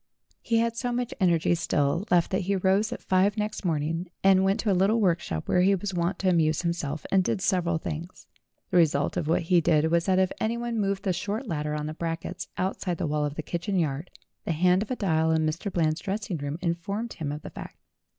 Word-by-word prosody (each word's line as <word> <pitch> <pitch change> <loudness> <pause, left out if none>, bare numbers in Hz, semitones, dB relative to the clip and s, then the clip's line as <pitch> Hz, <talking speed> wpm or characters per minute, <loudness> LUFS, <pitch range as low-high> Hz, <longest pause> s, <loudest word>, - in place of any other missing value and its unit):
He 230 - +1
had 230 0 +1
so 245 +1 -2
much 245 0 -2
energy 170 -4 +3
still 165 +1 0
left 175 -2 +3
that 190 - +1
he 195 +2 0
rose 195 +4 +2
at - - -6
five 195 +3 +2
next 210 0 -3
morning, 165 +1 -1
and 190 -1 +5
went 195 +2 +2
to 215 - +1
a - - +4
little 195 +5 +3
workshop 170 - 0
where 180 - +3
he 195 +2 +4
was 195 +1 -4
wont 175 +2 0
to 190 - +1
amuse 160 -2 +2
himself, 155 -4 -2
and 190 -1 +4
did 190 - -1
several 180 -4 +1
things. 160 +2 -6 0.5
The 180 - +3
result 150 -4 +3
of 150 - -2
what 165 - +2
he 175 +1 +3
did 160 0 +2
was 170 +1 +2
that 185 -1 +3
if 190 0 +2
anyone 235 +1 -1
moved 195 -1 -1
the 190 - +1
short 205 +7 -3
ladder 150 -6 -2
on 150 0 -3
the 155 - -4
brackets 165 +2 -4
outside 185 -1 -2
the - - -2
wall 150 -1 0
of 145 0 -4
the 155 - -4
kitchen 175 +5 -2
yard, 155 0 -1 0.3
the 165 - -1
hand 180 +4 +3
of 215 - -4
a 255 - -1
dial 160 -7 +1
in 160 -1 +2
Mr. 165 +6 -2
Eland's 160 -2 0
dressing 195 -2 -3
room 145 +1 -4
informed 195 +6 -2
him 150 -4 -4
of 150 +1 -6
the - - -8
fact. - - -9
180 Hz, 230 wpm, -27 LUFS, 160-195 Hz, 0.5 s, and